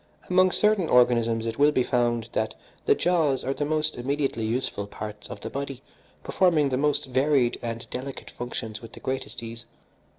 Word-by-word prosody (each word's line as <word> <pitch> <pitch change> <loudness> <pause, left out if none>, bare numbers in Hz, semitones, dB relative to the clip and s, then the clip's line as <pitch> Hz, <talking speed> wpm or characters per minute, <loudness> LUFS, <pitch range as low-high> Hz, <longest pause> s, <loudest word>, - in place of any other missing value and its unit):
Among 185 +1 +5
certain 210 -4 +2
organisms 115 -2 +4
it 115 +2 -4
will 145 +1 +6
be 130 -3 +2
found 120 -2 0
that 110 - -1 0.3
the - - +6
jaws 160 -7 +2
are 135 - -1
the 145 - -2
most 155 0 0
immediately 135 -2 -1
useful 110 -3 -1
parts 105 0 -7
of 100 - -8
the - - -5
body, 140 -1 -5 0.4
performing 165 -6 +3
the 130 - 0
most 145 +1 +2
varied 130 -1 +2
and 115 0 -4
delicate 135 +2 -6
functions 115 -3 -5
with 115 -1 -11
the - - -10
greatest 130 -2 -4
ease. 115 +1 -8
130 Hz, 175 wpm, -26 LUFS, 115-145 Hz, 0.4 s, will